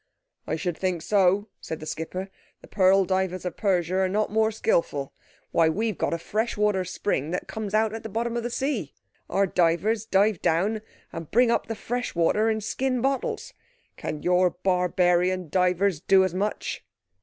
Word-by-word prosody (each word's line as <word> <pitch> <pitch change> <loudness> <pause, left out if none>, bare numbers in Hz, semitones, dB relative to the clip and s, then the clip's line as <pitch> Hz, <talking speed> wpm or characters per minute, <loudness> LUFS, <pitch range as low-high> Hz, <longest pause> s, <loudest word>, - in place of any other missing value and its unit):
"I - - -1
should 175 +1 -2
think 185 -3 -1
so," 200 +1 +2
said 160 - -6
the 155 - -8
skipper. 185 +5 -5 0.3
"The - - -13
pearl 190 0 +4
divers 185 -1 -1
of 180 - -3
Persia 185 -3 +1
are 190 -1 +2
not 210 +2 0
more 220 0 +3
skilful. 165 -10 0 0.4
Why, 165 -1 +4
we've 215 +5 -1
got - - -1
a 170 - 0
fresh 215 +8 -2
water 210 -3 +2
spring 175 -4 -2
that 180 - -3
comes 215 -2 -4
out 220 0 +2
at 225 - -5
the 220 - -7
bottom 230 +2 -2
of 235 - -1
the 240 - -3
sea. 275 +4 -2 0.3
Our 200 +1 +2
divers 190 +5 +1
dive 200 -2 +2
down 200 +7 +1 0.3
and 165 -2 -7
bring 240 +1 +4
up - - 0
the 225 - -3
fresh 245 +1 -4
water 210 +6 +2
in 220 -1 0
skin 255 +4 -1
bottles! 270 +1 -2 0.4
Can 150 - -5
your 180 0 +4
barbarian 180 -1 +1
divers 180 0 +2
do 190 +3 +4
as 185 -2 -1
much?" 205 +3 -3
190 Hz, 180 wpm, -25 LUFS, 180-220 Hz, 0.4 s, pearl